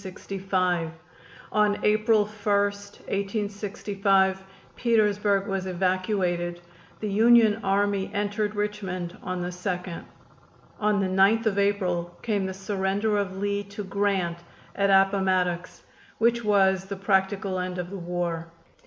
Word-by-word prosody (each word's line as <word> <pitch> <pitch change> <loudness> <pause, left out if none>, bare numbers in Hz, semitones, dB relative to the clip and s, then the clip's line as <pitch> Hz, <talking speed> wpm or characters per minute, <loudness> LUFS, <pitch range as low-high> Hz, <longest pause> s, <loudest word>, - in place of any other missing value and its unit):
On 210 -1 +2
April 215 0 +3
1, - - -11 0.4
1865, 200 -1 -1 0.3
Petersburg 210 -4 +2
was 195 -1 -2
evacuated, 180 -1 -1 0.4
the 215 - -3
Union 220 +1 +5
Army 200 0 +1
entered 205 +1 -1
Richmond 190 -4 -3
on 185 -1 -4
the 175 - -2
2d. 180 -1 -4 0.8
On 210 -1 +2
the - - +1 0.2
9th 225 +4 +4
of 200 -2 +1
April 180 -4 0
came 205 -4 0
the 190 - -4
surrender 200 +2 0
of 190 -1 -3
Lee 200 +1 -1
to 200 +1 -7
Grant 195 -3 -1 0.4
at 200 0 +2
Appomattox, 190 -2 +2 0.3
which 235 +1 +2
was 190 -2 +3
the 200 +1 -5
practical 195 0 0
end 180 0 -3
of 180 0 -5
the 200 - -5
war. 170 -1 -3
195 Hz, 120 wpm, -26 LUFS, 185-205 Hz, 0.8 s, Union